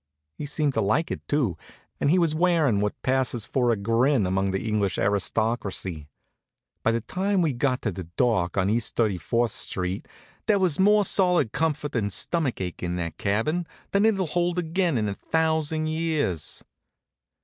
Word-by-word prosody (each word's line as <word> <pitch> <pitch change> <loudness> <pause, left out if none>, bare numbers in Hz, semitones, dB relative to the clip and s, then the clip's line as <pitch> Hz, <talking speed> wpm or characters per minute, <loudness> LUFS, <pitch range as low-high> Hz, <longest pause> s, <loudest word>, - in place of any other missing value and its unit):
He 145 - -6
seemed 150 -1 0
to - - +1
like 145 - +1
it, - - -4
too, 120 - 0 0.4
and - - +2
he 175 - +4
was 165 -4 +2
wearin' 160 - +2
what 105 0 -2
passes 130 -4 0
for 125 -2 +1
a 115 - +3
grin 115 +3 +2
among 95 +1 0
the 95 +3 -2
English 105 -3 0
aristocracy. 100 -5 -1 0.7
By 115 - +2
the 115 - 0
time 190 - 0
we 155 -4 +1
got 125 +1 0
to 110 - 0
the 90 0 -7
dock 90 0 0
at 95 0 +2
East 115 +4 0
34th 115 +2 +1
st. 90 -1 -2 0.4
there 210 - +4
was 185 -5 +1
more 205 +1 +5
solid 180 - +3
comfort 150 -3 -1
and 100 -3 0
stomach 155 - 0
ache 90 -2 -5
in 90 0 -2
that 85 -2 -4
cabin 150 - 0 0.2
than 200 +2 +3
it'll 195 -4 +2
hold 175 +2 0
again 170 -3 0
in 105 -2 0
a 100 - -2
thousand 160 +4 0
years. 155 - -1
125 Hz, 170 wpm, -25 LUFS, 100-160 Hz, 0.7 s, more